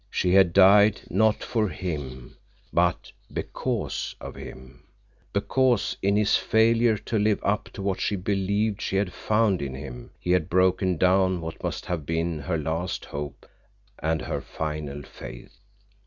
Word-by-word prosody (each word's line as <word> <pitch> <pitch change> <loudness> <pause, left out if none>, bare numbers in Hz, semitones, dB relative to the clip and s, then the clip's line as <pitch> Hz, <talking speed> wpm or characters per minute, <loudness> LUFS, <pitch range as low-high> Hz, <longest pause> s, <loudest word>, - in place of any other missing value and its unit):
She 90 -2 +1
had 95 -3 +6
died, 100 +3 +6
not 110 +2 +2
for 110 -3 0
him, 70 -10 -6 0.4
but - - +1 0.2
because - - -3
of - - -8
him—because, 100 - -3
in 100 +1 +2
his 105 -1 +3
failure 115 0 +3
to 110 +2 -2
live 105 0 +2
up 105 +1 0
to 100 - -6
what 95 -1 -1
she 105 - 0
believed 100 +2 0
she - - -2
had 95 -2 0
found 105 -4 +1
in 70 -2 -4
him, 65 -3 -8
he 90 - -2
had 90 -3 +2
broken 95 0 +2
down 95 +1 +3
what 80 -1 -7
must - - -3
have 85 -4 -3
been 80 -1 -1
her 80 +4 -2
last 80 +4 -3
hope 70 -1 -6 0.5
and 80 0 -1
her - - -3
final 75 -2 -5
faith. - - -11
95 Hz, 150 wpm, -26 LUFS, 80-100 Hz, 0.5 s, had